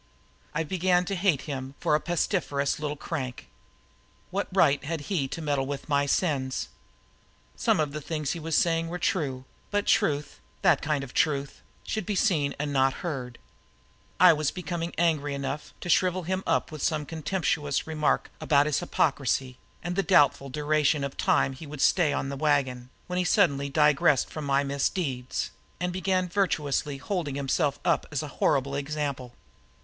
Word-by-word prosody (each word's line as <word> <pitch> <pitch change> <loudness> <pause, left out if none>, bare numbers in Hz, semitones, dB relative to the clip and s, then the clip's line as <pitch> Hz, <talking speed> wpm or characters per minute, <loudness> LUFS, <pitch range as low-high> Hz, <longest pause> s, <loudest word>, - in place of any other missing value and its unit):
I 160 - +1
began 180 +1 +2
to 195 - -2
hate 175 -7 +2
him 135 -2 -5
for - - +1
a 150 - +4
pestiferous 160 -5 0
little 150 -1 -2
crank. 135 -6 -5 0.8
What 200 +2 -1
right 145 -7 +3
had 160 +1 -3
he 145 -3 -1
to 165 +4 -6
meddle 140 -3 0
with 140 -1 -5
my 140 -2 +2
sins? 135 - 0 0.9
Some - - +2
of 150 -2 0
the 150 +1 -5
things 155 -1 -2
he 170 - -3
was 160 0 0
saying 165 -1 +2
were 175 +2 -4
true; 140 -7 -1 0.3
and 205 0 +1
truth 145 0 +1 0.2
that - - +4
kind 145 -2 0
of 125 - -9
truth 140 -3 0 0.2
should 215 -4 -3
be 205 - -1
seen 155 - +1
and 145 0 -2
not 135 -1 +1
heard. 125 -7 -4 0.8
I - - +8
was 150 -2 0
becoming 175 -2 -4
angry 155 -4 +1
enough 140 +2 -4
to - - -6
shrivel 185 +1 +2
him 185 +3 -1
up - - +1
with 155 -2 -7
some 155 -1 0
contemptuous 155 -3 -1
remark 155 -2 0
about 145 -1 +4
his 150 -2 +1
hypocrisy 135 -6 0 0.2
and 175 +1 -3
the 195 - +2
doubtful 145 -7 +4
duration 150 +1 +1
of 140 -1 -4
time 135 - +2
he 145 +4 -10
would 150 0 -8
stay 165 +1 +4
on 135 -1 -2
the 140 - -4
wagon 135 -4 0 0.2
when 180 -1 -2
he - - +2
suddenly 140 -8 +2
disgressed 150 -2 +3
from 155 -2 -5
my 140 0 +2
misdeeds 140 -2 -2 0.3
and 180 0 -1
began 185 0 0
virtuously 150 -7 0
holding 150 -1 -3
himself 140 0 0
up - - +2
as 145 0 -2
a - - -5
horrible 140 0 +2
example. 140 -3 -3
150 Hz, 170 wpm, -27 LUFS, 140-170 Hz, 0.9 s, I